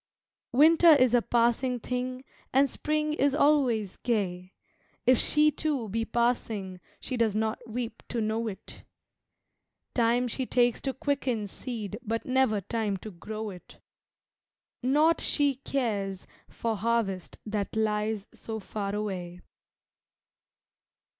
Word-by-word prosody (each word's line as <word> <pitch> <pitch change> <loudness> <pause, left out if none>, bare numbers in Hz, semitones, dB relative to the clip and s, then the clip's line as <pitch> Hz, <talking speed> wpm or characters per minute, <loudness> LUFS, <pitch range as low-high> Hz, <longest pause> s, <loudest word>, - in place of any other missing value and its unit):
Winter 320 +6 +6
is 255 -3 +4
a 245 - +5
passing 240 +2 +1
thing 255 +2 -3 0.3
and 275 +2 +4
Spring 305 +3 -1
is 280 -2 +2
always 260 -10 +2
gay; 185 -6 -2 0.5
If 255 -2 +5
she, 300 0 +4
too, 285 -6 -2
be 225 +3 -1
passing 225 -6 -1 0.2
she 255 - -4
does 225 -3 +2
not 220 0 -1
weep 230 0 -4
to 240 - -2
know 220 +1 -1
it. 200 -1 -8 1.1
Time 240 +1 +2
she 255 +2 -3
takes 245 -1 +2
to 270 - -2
quicken 265 -6 -1
seed 215 0 -6
but 225 +1 -3
never 255 -5 +2
time 210 0 -2
to 215 +3 -9
grow 215 +4 -6
it 180 -2 -13 1.0
Naught 300 +6 +3
she 285 -2 +2
cares 210 -9 -2 0.2
for 230 -1 -2
harvest 210 -4 -1
that 210 -1 -3
lies 215 -1 0
so 220 -1 -6
far 200 0 -4
away. 180 -4 -4
230 Hz, 125 wpm, -28 LUFS, 210-255 Hz, 1.1 s, Winter